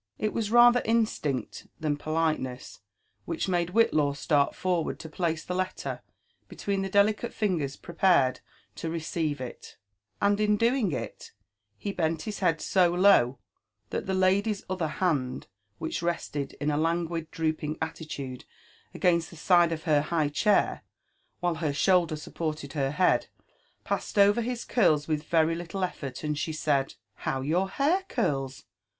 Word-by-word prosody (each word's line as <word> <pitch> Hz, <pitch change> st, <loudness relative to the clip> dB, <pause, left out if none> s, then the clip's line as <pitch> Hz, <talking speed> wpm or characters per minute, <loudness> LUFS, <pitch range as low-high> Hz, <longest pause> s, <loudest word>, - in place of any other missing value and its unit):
It 215 Hz, -, -1 dB
was 220 Hz, -3 st, -1 dB
rather 240 Hz, +1 st, +7 dB
instinct 215 Hz, -, -1 dB
than 150 Hz, -2 st, 0 dB
politeness 155 Hz, -, -2 dB, 0.5 s
which 165 Hz, +2 st, -2 dB
made 175 Hz, -2 st, 0 dB
Whillaw 155 Hz, -9 st, +3 dB
start 140 Hz, 0 st, +1 dB
forward 180 Hz, -3 st, -1 dB
to 165 Hz, -1 st, -9 dB
place 165 Hz, 0 st, -2 dB
the 180 Hz, -, -4 dB
letter 185 Hz, 0 st, -3 dB, 0.5 s
between 200 Hz, -1 st, -2 dB
the 195 Hz, -, -2 dB
delicate 210 Hz, +4 st, +2 dB
fingers 165 Hz, -10 st, -1 dB
prepared 165 Hz, -7 st, +2 dB, 0.4 s
to 165 Hz, -, -3 dB
re 165 Hz, +1 st, -2 dB
ceive 155 Hz, -2 st, -2 dB
it; 125 Hz, -2 st, -9 dB, 0.4 s
and 200 Hz, 0 st, +2 dB
in 210 Hz, 0 st, +3 dB
doing 230 Hz, -3 st, +2 dB
il, -, -, -3 dB, 0.7 s
he 200 Hz, -, -4 dB
bent 160 Hz, -4 st, -1 dB
his 215 Hz, -2 st, -5 dB
head 165 Hz, -5 st, +1 dB
so 185 Hz, -2 st, +3 dB
low, 175 Hz, -9 st, +4 dB, 0.5 s
that -, -, -3 dB
the 190 Hz, -, 0 dB
lady's 195 Hz, +3 st, +2 dB
other 185 Hz, -3 st, -1 dB
hand, 150 Hz, -6 st, -1 dB, 0.3 s
which 160 Hz, -, -3 dB
rested 165 Hz, -4 st, -2 dB
in 150 Hz, +1 st, -2 dB
a 145 Hz, -, 0 dB
languid, 165 Hz, 0 st, -1 dB
drooping 155 Hz, -1 st, -2 dB
allilude 155 Hz, -5 st, -6 dB, 0.5 s
against 170 Hz, -2 st, +2 dB
the -, -, -13 dB
side 175 Hz, +1 st, +4 dB
of 160 Hz, -1 st, -4 dB
her 150 Hz, -4 st, +3 dB
high 155 Hz, -1 st, 0 dB
chair, 200 Hz, +7 st, +2 dB, 0.6 s
while 175 Hz, -1 st, +1 dB
her 150 Hz, -3 st, 0 dB
shoulder 175 Hz, -1 st, +3 dB
supported 155 Hz, -2 st, -5 dB
her 135 Hz, -3 st, 0 dB
head, 180 Hz, +6 st, +2 dB, 0.6 s
passed -, -, -3 dB
over 205 Hz, +3 st, +5 dB
his 240 Hz, 0 st, -3 dB
curls 155 Hz, -11 st, +2 dB
with 155 Hz, -2 st, 0 dB
very 160 Hz, 0 st, +2 dB
little 175 Hz, +3 st, -5 dB
elTort, 140 Hz, -8 st, -4 dB
and 150 Hz, -1 st, -1 dB
she 160 Hz, -, -2 dB
said, 140 Hz, -3 st, 0 dB, 0.2 s
How 135 Hz, -, -2 dB
your 175 Hz, +8 st, 0 dB
hair 310 Hz, -, +1 dB
curls! 135 Hz, -, -2 dB
165 Hz, 155 wpm, -28 LUFS, 150-195 Hz, 0.7 s, rather